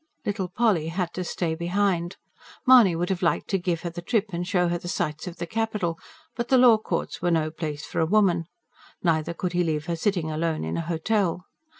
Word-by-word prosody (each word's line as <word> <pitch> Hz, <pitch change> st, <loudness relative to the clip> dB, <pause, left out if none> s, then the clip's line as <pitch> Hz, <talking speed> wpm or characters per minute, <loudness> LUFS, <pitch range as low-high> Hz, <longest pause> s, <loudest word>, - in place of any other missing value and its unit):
Little 195 Hz, -2 st, -1 dB
Polly 190 Hz, -4 st, +1 dB
had 175 Hz, +1 st, -2 dB
to 185 Hz, -, -3 dB
stay 170 Hz, -2 st, -2 dB
behind. 175 Hz, +1 st, 0 dB, 0.5 s
Mahony 245 Hz, -9 st, +7 dB
would 175 Hz, +2 st, -1 dB
have 185 Hz, -, -2 dB
liked 170 Hz, -, +1 dB
to 195 Hz, -, +1 dB
give 175 Hz, -2 st, -1 dB
her 170 Hz, -, -4 dB
the 175 Hz, -, -7 dB
trip 205 Hz, +1 st, -1 dB
and 175 Hz, +1 st, -3 dB
show 180 Hz, -2 st, +2 dB
her 175 Hz, 0 st, -1 dB
the 175 Hz, -, -8 dB
sights 155 Hz, -2 st, -2 dB
of 175 Hz, -1 st, -7 dB
the 170 Hz, -, -3 dB
capital; 210 Hz, -4 st, -2 dB, 0.4 s
but 235 Hz, -1 st, -2 dB
the 260 Hz, -, +4 dB
law 245 Hz, -3 st, +7 dB
courts -, -, -3 dB
were 175 Hz, -, +1 dB
no 160 Hz, -2 st, +1 dB
place 155 Hz, -2 st, -5 dB
for -, -, -4 dB
a 160 Hz, -, +2 dB
woman; 185 Hz, -5 st, +3 dB, 0.6 s
neither 165 Hz, -1 st, +1 dB
could 180 Hz, +1 st, -3 dB
he 175 Hz, 0 st, +2 dB
leave 155 Hz, -2 st, -1 dB
her 170 Hz, -, -1 dB
sitting 170 Hz, -2 st, -1 dB
alone 160 Hz, 0 st, -1 dB
in 80 Hz, -, -3 dB
a -, -, -1 dB
hotel. 175 Hz, +2 st, -1 dB
175 Hz, 220 wpm, -25 LUFS, 165-195 Hz, 0.6 s, Mahony